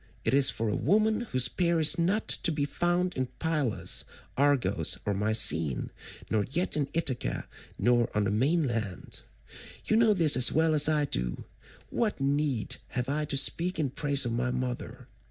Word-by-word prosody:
It 110 - 0
is 135 0 +4
for 115 - -3
a 105 - -1
woman 215 +5 +1
whose 130 -1 +3
peer 170 -2 -1
is 155 +2 +5
not 190 +6 -1
to 170 - +2
be 145 -2 -2
found 175 +4 -2
in 130 -1 -2
Pylos, 155 -8 -2 0.3
Argos, 140 -2 +1
or 105 - -1
Mycene, 95 - +3 0.4
nor 110 -2 -1
yet 170 +5 -2
in 145 -2 -2
Ithaca 140 -7 -3 0.3
nor 120 -1 +1
on 105 - +1
the 100 - -1
mainland. 120 - -2 0.6
You 220 - +1
know 225 -2 +3
this 165 -5 +5
as 125 -1 +5
well 160 0 +1
as 150 0 +5
I 150 -1 +1
do; - - -3 0.5
what 220 -8 -2
need 140 -3 -1
have 125 +1 -4
I 150 +2 -2
to 140 -1 -1
speak 170 +6 +2
in 145 -5 -2
praise 140 -1 +1
of 120 - -3
my 120 +2 -2
mother? 125 -1 -6
140 Hz, 170 wpm, -27 LUFS, 120-165 Hz, 0.6 s, is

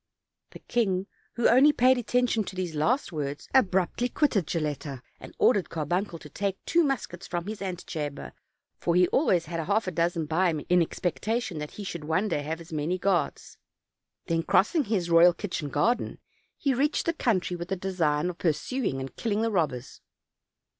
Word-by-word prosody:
The - - -11
king, 195 -6 0 0.3
who 235 - +3
only 265 +5 +6
paid 255 -2 +4
attention 245 -1 +1
to 190 - -7
these 180 -3 -3
last 220 - +1
words, 145 -3 -4
abruptly 195 0 +2
quitted 220 - +1
Gilletta, 145 -5 -3 0.2
and - - -12
ordered 205 -7 +3
Carbuncle 170 +4 -2
to 150 - -12
take 195 +5 -3
two 340 0 +3
muskets 265 - -3
from 175 -1 -3
his 210 0 -6
antechamber, 160 -6 -5 0.5
for 170 - 0
he 180 0 +5
always 180 - +2
had 165 +1 -4
half 205 +6 +1
a 185 - -2
dozen 170 -1 0
by 170 +4 +2
him 155 -3 -3
in 180 0 +5
expectation 200 +3 -2
that 150 0 -6
he 210 - -5
should 170 -5 -5
one 160 +7 +1
day 145 - 0
have 160 +3 -4
as 165 0 -11
many 155 +4 -1
guards. 180 -4 -1 0.7
Then, 165 0 0
crossing 265 - +2
his 190 -6 -1
royal 170 +1 +7
kitchen 175 -7 -4
garden, 240 - 0 0.4
he 275 - +1
reached 285 +4 +1
the 335 - +1
country 200 - 0
with 175 0 -6
the 195 - -1
design 175 -4 0
of 175 - -16
pursuing 165 - -1
and 130 0 -7
killing 220 -1 -1
the 230 - 0
robbers. 145 - -2
180 Hz, 180 wpm, -27 LUFS, 160-220 Hz, 0.7 s, royal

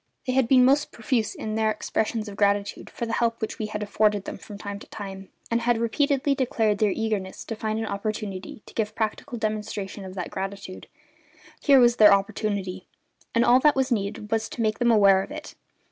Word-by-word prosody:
They 255 - -1
had 260 -2 +3
been 255 0 +6
most 280 +3 +3
profuse 240 -7 -1
in 215 - -4
their 220 0 +1
expressions 215 0 -2
of 205 - -7
gratitude 200 0 0
for 235 - -4
the 230 - -4
help 230 -1 +1
which 220 - -4
we 215 - -2
had 210 0 -4
afforded 205 -1 +1
them - - -6
from 205 - -10
time 200 0 -6
to - - -13
time, 195 -2 -8 0.2
and 230 0 +2
had 240 0 +2
repeatedly 280 +4 +1
declared 225 -6 0
their 215 - +3
eagerness 205 -2 -3
to 225 - -4
find 215 0 -2
an 225 - -2
opportunity 205 -1 -4
to - - -14
give 215 -1 -2
practical 230 +3 -3
demonstration 210 -2 -3
of 190 0 -8
that 180 -2 -5
gratitude: 195 -1 -6 0.7
here 275 -2 +6
was 240 -1 +5
their 210 -2 +8
opportunity; 195 -2 -3 0.5
and 235 - +4
all 245 +1 +6
that 295 +2 +4
was 265 0 0
needed 210 -1 -2
was 225 0 0
to 235 - -5
make 215 -1 0
them 240 -1 +3
aware 200 -4 +6
of - - -7
it. - - -8
215 Hz, 205 wpm, -25 LUFS, 200-235 Hz, 0.7 s, their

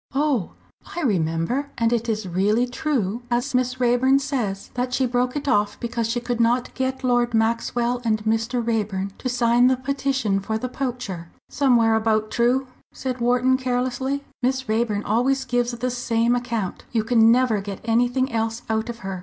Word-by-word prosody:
"Oh, 275 - 0 0.4
I 345 - -2
remember. 185 - 0
And 230 0 +2
it 235 0 -1
is 215 -3 -2
really 205 +7 +2
true, 245 -5 -2
as 240 +1 -1
Miss 250 0 0
Raeburn 250 +2 +4
says, 250 -9 -3
that 250 0 -1
she 260 - +2
broke 250 +1 0
it 290 -1 -3
off 205 -4 +1
because 235 -1 -2
she 240 +1 0
could 240 0 -3
not 240 +2 +1
get 260 0 -2
Lord 245 -2 +2
Maxwell 235 +2 0
and 220 -2 +2
Mr. 225 +2 0
Raeburn 205 -4 -1
to 255 - -2
sign 240 0 +3
the 260 0 +3
petition 265 -6 -1
for 220 +3 -2
the 255 +3 -4
poacher?" 240 -11 -4 0.2
"Somewhere 240 -5 +3
about 220 -1 +1
true," 245 +3 +2 0.3
said 255 -2 -4
Wharton, 250 +2 +3
carelessly. 255 +2 -1 0.2
"Miss 260 +1 0
Raeburn 215 -1 0
always 265 +5 +1
gives 245 -1 0
the 245 +1 -2
same 235 -1 +1
account; 230 -6 -3
you 225 -3 +1
can 225 0 +5
never 240 -4 +2
get 195 -1 -6
anything 245 +3 +1
else 225 0 -2
out 220 +2 -1
of 235 -1 -6
her. 190 -1 -4
240 Hz, 175 wpm, -23 LUFS, 220-255 Hz, 0.4 s, can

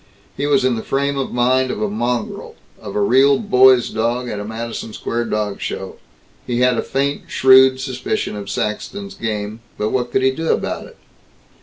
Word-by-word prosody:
He 140 +2 -2
was 140 -3 +3
in 130 -2 +2
the - - -3
frame 140 +3 -1
of 135 -1 -3
mind 130 +2 +2
of - - -3
a 105 - 0
mongrel, 120 +4 -3 0.3
of 100 -2 -8
a 105 - +1
real 135 +6 +4
Boys' 130 - +4
Dog, 120 +3 -1
at 105 - -4
a - - -4
Madison 110 0 -6
Square 120 +2 -3
dog 105 -2 -2
show. - - -5 0.5
He 120 0 0
had 125 0 +4
a - - +2
faint 140 +1 -2
shrewd 130 0 +6
suspicion 130 -4 -3
of 100 -1 -7
Saxton's 200 - -4
game. 110 - -4 0.2
But 105 +1 -1
what 125 -1 -1
could 130 - +1
he 130 - +4
do 160 +5 -4
about - - -2
it? - - -17
125 Hz, 190 wpm, -19 LUFS, 110-130 Hz, 0.5 s, shrewd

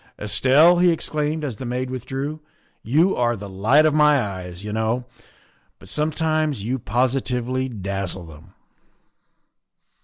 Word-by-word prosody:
" - - -29
Estelle," 140 - +4
he 180 0 +5
exclaimed 155 -1 -2
as 130 -7 -4
the - - -7
maid 125 +1 -3
withdrew, 135 +4 -4 0.2
" - - -37
you 160 - +2
are 120 -1 +1
the 100 -1 -8
light 110 +11 +3
of 155 - +3
my 150 -1 +5
eyes, 95 -4 -5
you 105 0 -5
know, 110 +3 -1 0.7
but - - -14
sometimes 155 -4 0
you 125 +4 -2
positively 125 +2 -1
dazzle 100 -4 -4
them." 75 -2 -15
130 Hz, 145 wpm, -22 LUFS, 105-150 Hz, 0.7 s, he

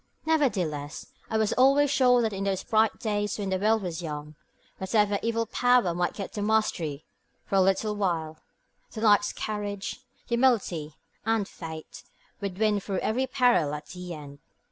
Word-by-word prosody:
Nevertheless, 185 - 0 0.2
I 220 - 0
was 220 -1 +1
always 275 +2 +4
sure 250 -3 +4
that 220 -2 0
in 195 0 -3
those 195 -1 -1
bright 220 -1 +2
days 210 -3 -1
when 200 -2 -3
the 185 - 0
world 215 +1 +2
was 175 -2 -4
young, 150 -2 -6 0.5
whatever 205 +1 +2
evil 230 0 0
power 245 -5 +3
might 175 +1 -1
get 195 - -6
the 210 - -3
mastery 200 -9 0 0.4
for - - -10
a - - +6
little 195 +3 +1
while, 165 -6 -2 0.5
the 220 - -6
knight's 205 -2 +4
courage, 205 0 -4 0.3
humility, 220 - +1 0.3
and 225 -2 +1
faith 160 -2 -9 0.4
would 200 -3 -4
win 210 -1 +2
through 195 -1 -3
every 255 +4 0
peril 245 - +2
at 150 - -9
the 180 -2 -7
end. 145 -2 -11
205 Hz, 165 wpm, -27 LUFS, 175-225 Hz, 0.5 s, a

